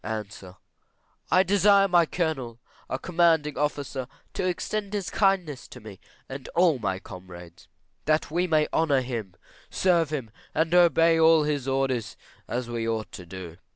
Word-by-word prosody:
A. 110 -1 -3 1.0
I 185 - +5
desire 200 +1 +4
my 175 -3 +4
Colonel, 135 -10 -3 0.3
our - - -1
commanding 165 -4 +2
officer, 140 -3 -2 0.3
to 185 - -1
extend 200 +3 -3
his 195 -5 -3
kindness 185 - 0
to - - -12
me 105 -3 -11 0.3
and 135 0 -8
all 170 -6 +4
my 95 -4 -1
comrades; 90 -2 -12 0.4
that 155 -1 +1
we 175 +3 +1
may 155 -2 +2
honour 145 -5 +2
him, 115 -7 -5 0.3
serve 170 -4 +2
him, 135 -8 -4 0.2
and 160 +2 +1
obey 165 -2 +5
all 160 -1 +6
his 145 -3 -2
orders 135 -4 -1 0.3
as 125 0 -3
we 115 -1 -3
ought 110 -1 -3
to 90 -2 -10
do. 85 -1 -9
150 Hz, 155 wpm, -26 LUFS, 115-170 Hz, 1.0 s, all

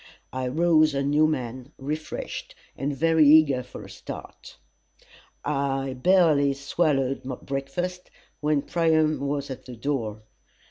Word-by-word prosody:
I 130 0 -2
rose 155 +1 +3
a 140 - 0
new 150 +2 +3
man, 130 -1 -4
refreshed 150 +3 -5 0.2
and 140 +1 -3
very 160 +2 +4
eager 145 -4 +6
for - - -10
a - - -12
start. - - -10 0.9
I 135 -2 -1
barely 150 -1 +4
swallowed 135 -1 0 0.2
breakfast 175 +7 -4 0.3
when 150 -1 +1
Priam 160 -2 +2
was 140 0 -2
at 130 - -8
the 125 - -8
door. 115 -4 -3
140 Hz, 125 wpm, -25 LUFS, 135-155 Hz, 0.9 s, eager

